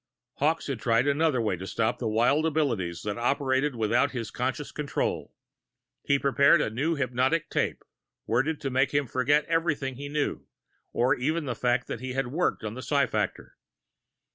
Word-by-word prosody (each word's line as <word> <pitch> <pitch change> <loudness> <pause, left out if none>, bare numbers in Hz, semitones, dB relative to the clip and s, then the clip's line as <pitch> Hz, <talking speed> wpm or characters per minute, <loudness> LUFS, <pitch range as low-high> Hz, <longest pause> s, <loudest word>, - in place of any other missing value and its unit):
Hawkes 155 +3 +1
had 135 -5 -3
tried 115 +2 +2
another 145 -1 +2
way 110 -5 0
to 95 +2 -7
stop 110 +2 -1
the 120 - -2
wild 120 +8 +2
abilities 115 - -1
that 105 +2 -3
operated 130 +2 +1
without 120 +5 +1
his 115 -4 -4
conscious 130 +3 -3
control. 150 -2 -3 0.7
He'd 140 0 +1
prepared 140 +1 +5
a - - 0
new 150 +9 0
hypnotic 130 +3 0
tape, - - -1 0.4
worded 135 +7 0
to 135 - -2
make 130 +2 +1
him 145 0 +2
forget 145 +5 +2
everything 155 -6 -1
he 140 +1 -6
knew, 150 0 -2 0.4
or 125 +3 +2
even 155 +4 -1
the 130 - -2
fact 125 +1 0
that - - -5
he 130 0 -4
had 135 -1 -1
worked 165 0 -1
on 105 -1 -4
the 130 - -7
psi 140 0 +2
factor. 105 -3 -3
130 Hz, 175 wpm, -27 LUFS, 120-145 Hz, 0.7 s, prepared